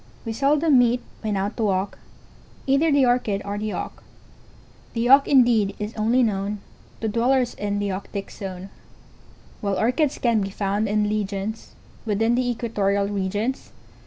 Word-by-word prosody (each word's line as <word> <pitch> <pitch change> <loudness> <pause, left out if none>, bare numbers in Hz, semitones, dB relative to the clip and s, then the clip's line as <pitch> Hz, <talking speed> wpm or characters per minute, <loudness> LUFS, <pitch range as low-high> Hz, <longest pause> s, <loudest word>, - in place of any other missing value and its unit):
] - - -27
We 225 - -3
seldom 285 +2 +3
meet, 245 0 +2 0.2
when 215 -2 -1
out 200 +3 -2
to 225 - -1
walk, 195 0 -1 0.7
Either 275 +4 +3
the 280 -2 +4
Orchid 245 -5 +1
or 200 0 -3
the 215 0 -3
Auk; - - -6 0.9
The 230 +1 0
Auk 275 +2 +7
indeed 235 -7 +4
is 210 +2 -5
only 230 +4 +2
known 205 -1 -1 0.4
To 225 - -1
dwellers 245 +3 +1
in 205 0 -3
the 205 0 -1
Auktic 195 +1 -5
zone, 190 -1 -7 0.9
While 200 -2 -1
Orchids 260 +6 +1
can 230 -3 +2
be 195 - -2
found 200 +2 -1
in 210 0 +1
legions, 210 +1 -3 0.3
Within 225 +1 +1
the 245 0 +1
equatorial 200 -4 0
regions. 205 +6 -2
215 Hz, 160 wpm, -23 LUFS, 200-245 Hz, 0.9 s, Auk